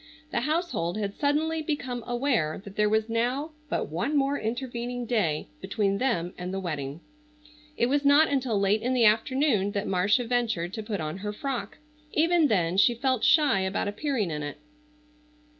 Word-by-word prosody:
The - - +1
household 290 - -1
had 200 -2 -2
suddenly 315 +4 0
become 260 -6 -3
aware 240 - 0
that 200 -1 -11
there 210 0 +2
was 220 +1 +1
now 245 +7 -1 0.2
but - - -2
one 275 - 0
more 275 0 +2
intervening 245 +1 -3
day 200 -11 0
between 200 +1 0
them 180 -9 0
and 180 +1 -4
the 195 - -2
wedding. 150 -4 -4 0.8
It - - +3
was 280 +3 +1
not 285 +3 +6
until 255 -7 0
late 200 +2 +2
in 255 +2 0
the 240 -2 +4
afternoon 220 -1 +2
that 200 - -1
Marcia 205 +6 +2
ventured 225 -7 -1
to 220 - -4
put 210 -4 -4
on 155 +2 -4
her 210 +2 -4
frock. 235 -2 -4 0.4
Even 330 0 +4
then 180 -6 +1
she 240 +4 +5
felt 260 -1 0
shy 295 -10 +5
about 190 +1 -1
appearing 215 - -1
in 150 -1 -3
it. 145 -1 -5
225 Hz, 175 wpm, -27 LUFS, 195-270 Hz, 0.8 s, not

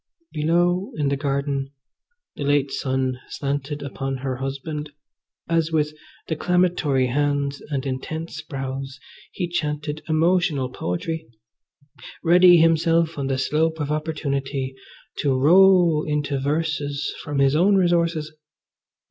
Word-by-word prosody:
Below 175 +5 +1
in 145 -2 0
the 140 - +1
garden 140 -1 -2 0.6
the - - -5
late 145 -1 +2
sun 130 -1 -1
slanted 145 +1 -3
upon 135 -1 -4
her 130 -1 -3
husband, 140 +3 -4 0.6
as 165 -1 +1
with 150 -1 +1 0.3
declamatory 165 -5 +1
hands 145 +1 0
and 140 -3 -2
intense 155 +4 -4
brows 135 -2 -6 0.3
he 180 - -3
chanted 150 -2 -3
emotional 160 -4 +2
poetry, 160 - -4 1.0
ready 175 +1 +7
himself 165 0 +3
on 135 - -2
the 135 -1 0
slope 160 +4 0
of 145 0 -2
opportunity 140 -3 -2 0.5
to 135 -3 +1
roll 175 0 +5
into 145 -2 -1
verses 145 0 -1
from 145 -1 -4
his 140 +1 +3
own 190 +6 +4
resources. 170 -4 +1
150 Hz, 115 wpm, -23 LUFS, 140-165 Hz, 1.0 s, ready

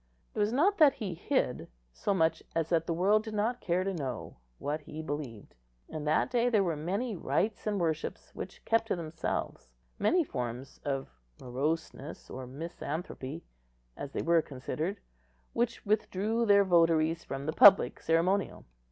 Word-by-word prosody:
It - - -4
was 210 +1 +2
not 350 - +3
that 295 -3 +7
he 205 -7 -4
hid, 160 - -1 0.3
so 205 - -1
much 165 -4 +2
as 165 -1 0
that 165 -1 +1
the 170 - +1
world 205 +5 +3
did 220 -1 -6
not 225 +4 0
care 180 +1 +1
to 195 0 -1
know, 130 -9 -5 0.2
what 150 +2 -3
he 150 +1 -9
believed. 140 -8 -6 0.4
In 155 -1 -5
that 155 +10 +2
day 245 0 +3
there 215 -4 +3
were 170 -4 0
many 195 +10 -2
rites 210 +5 -1
and 205 -2 0
worships 160 -3 -2
which - - -8
kept 225 0 +2
to - - +1
themselves—many 160 - -2
forms 125 - -5
of 135 - -2 0.3
moroseness 145 +3 -3
or 130 0 -6
misanthropy, 155 0 -5 0.5
as 140 - -6
they - - -2
were 165 0 +4
considered, 155 +8 -4 0.5
which 235 -1 -1
withdrew 215 +2 +1
their 200 -1 +7
votaries 165 -2 +3
from 135 +1 -5
the 155 - -1
public 200 -1 +7
ceremonial. 180 +4 +1
170 Hz, 160 wpm, -31 LUFS, 150-205 Hz, 0.5 s, that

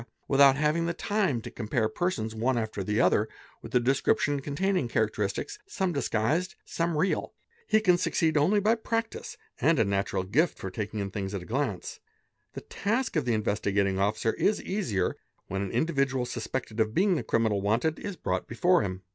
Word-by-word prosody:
without 140 -1 +6
having 155 +3 +1
the 170 - -2
time 195 - 0
to - - -8
compare 110 0 -1
persons, 110 -4 -2
one 120 +3 0
after 110 -3 -2
the 105 +3 0
other, 105 +2 +3 0.3
with - - -8
a - - +7
description 135 +3 +1
containing 150 +2 0
characteristics, 110 - -1
| - - -49
some 190 - -1
disguised, 145 - 0
some 165 -1 -1
real. 185 +5 0 0.3
He 215 - +4
can 180 -4 +4
succeed 160 -2 +1
only 170 +8 +4
by 215 +3 +3
practice 225 0 -3 0.2
and 165 +1 +3
a_ 115 - +3
natural 100 -1 0
gift 135 - +1
for 95 - -6
taking 105 +1 -4
in 100 -1 -4
things 100 0 -4
at 95 - -4
a - - -12
glance. 115 -5 -3 0.5
The - - -6
task 225 +4 -2
of 155 -5 +1
the 120 -3 +2
Investi 105 -2 -1
gating 100 -1 +2
Officer 110 +3 +1
is 210 - +1
easier 115 - -1 0.3
when 95 +1 -2
an 100 - -2
individual 135 - 0
suspected 115 -1 -4
of 110 0 +1
being 195 +1 +4
the 165 - 0
criminal 110 -3 +1
"wanted" 115 +10 +1
is 200 -2 -5
brought 90 - -2
before 175 +10 +3
him. 95 -1 -4
125 Hz, 190 wpm, -28 LUFS, 105-170 Hz, 0.5 s, a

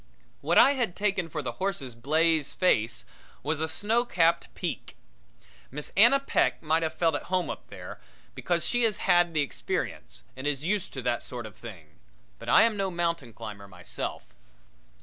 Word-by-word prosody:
What 165 +4 +1
I 270 - +8
had 240 -10 -1
taken 195 -4 0
for 150 -2 -4
the - - -2
horse's 175 -10 -2
blaze 155 +5 +1
face 120 - +1 0.4
was 155 +2 -1
a 160 - +1
snow 220 +8 +1
capped 170 -7 +2
peak. - - -5 0.7
Miss 150 +3 -7
Anna 235 +7 +7
Peck 275 - +1
might 160 +1 +2
have 160 -1 -2
felt 165 -2 +2
at 145 - -3
home 180 -3 0
up - - -9
there, - - -9 0.3
because 170 -2 -1
she 245 - +1
has 225 -3 +2
had 175 -2 +4
the 155 - +3
experience 140 - -4
and 130 +2 -4
is 145 0 -1
used 200 +1 -1
to 130 - -5
that 120 - 0
sort 120 -2 -5
of 110 -1 -10
thing, 85 -10 -12 0.4
but - - -7
I - - +7
am 230 -1 +2
no 195 -1 -1
mountain 170 -7 -2
climber 105 -3 -9
myself. 90 -2 -6
165 Hz, 180 wpm, -28 LUFS, 130-190 Hz, 0.7 s, I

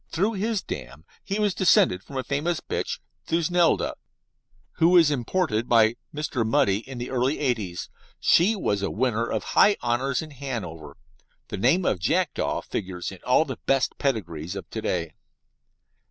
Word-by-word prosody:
Through 200 +7 0
his 210 +1 -1
dam 70 +6 -7 0.2
he 200 +1 -2
was 210 -2 +1
descended 135 - +4
from 135 +7 -9
a 130 - -1
famous 155 +5 -1
bitch, - - -3 0.3
Thusnelda, 170 +1 +2 0.8
who 165 +1 +5
was 170 -4 +6
imported 125 -3 -1
by 115 -1 +5 0.2
Mr. 150 -5 -2
Mudie 100 -3 +2
in 135 - -7
the 120 +1 -5
early 130 +3 +1
'eighties. 110 -11 -2 0.3
She 195 +7 +4
was 100 - -1
a 100 - -1
winner 115 0 0
of - - -2
high 205 0 +4
honours 125 +4 0
in 155 - -10
Hanover. 100 - -6 0.5
The - - -4
name 145 - +3
of 95 - +1
Jackdaw 165 - 0
figures 90 -3 -4
in 95 - -11
all 130 +5 +4
the 130 - -6
best 135 -1 +1
pedigrees 90 - -2
of 100 - -7
to 110 - -4
day. 85 -6 -2
130 Hz, 160 wpm, -25 LUFS, 100-165 Hz, 0.8 s, was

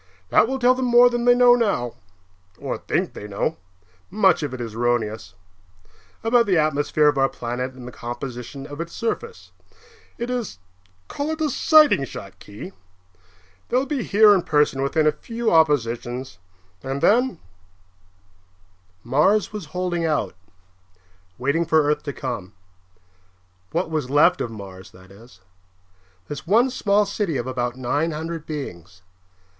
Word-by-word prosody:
That 225 - +4
will 265 +2 -2
tell 250 0 +4
them 255 0 -2
more 245 0 +6
than 240 0 -1
they 245 0 +6
know 245 0 +6
now 200 - 0 0.6
(or - - -4
think - - -2
they 105 - -8
know; 100 -1 -2 0.5
much 190 -4 +3
of 145 -4 -3
it 130 - -7
is 115 -2 -5
erroneous) 110 -5 -2 0.9
about 230 0 +3
the 185 -3 +3
atmosphere 150 0 +2
of 145 -2 +2
our 135 0 +3
planet 125 +1 -4
and 125 -1 -11
the - - -8
composition 125 +3 -7
of 145 +2 -7
its 170 0 -7
surface. 460 - -4 0.7
It 240 +1 -4
is 235 - -4 0.5
call 285 +2 -4
it 315 0 -3
a 305 -2 0
sighting 305 - +5
shot, 95 -6 -10
Khee. 105 - -10 1.0
They'll 255 +2 +1
be 280 -3 -2
here 210 -1 +5
in 190 - +2
person 150 -4 +1
within 150 +3 +1
a 155 - +5
few 230 +9 -3
oppositions. 125 - +1 0.4
And 135 +1 -4
then 245 -1 +3 0.8
" 90 -1 -36 0.7
Mars 160 - +2
was 210 -5 -6
holding 175 +2 -2
out, 150 - 0 1.0
waiting 140 +7 0
for 160 -1 +3
Earth 150 0 0
to 140 - -3
come. 110 -7 -5 1.2
What 170 - -2
was 150 -5 -2
left 150 +6 +4
of - - -2
Mars, 95 -4 -10
that 95 +1 -17
is; 100 -2 -17 0.9
this 145 -1 -7
one 235 +7 +3
small 210 -4 +2
city 200 -6 -2
of 120 - -3
about 125 -2 -2
nine 145 +6 -1
hundred 160 0 -5
beings. 90 - -7
150 Hz, 150 wpm, -22 LUFS, -, 1.2 s, more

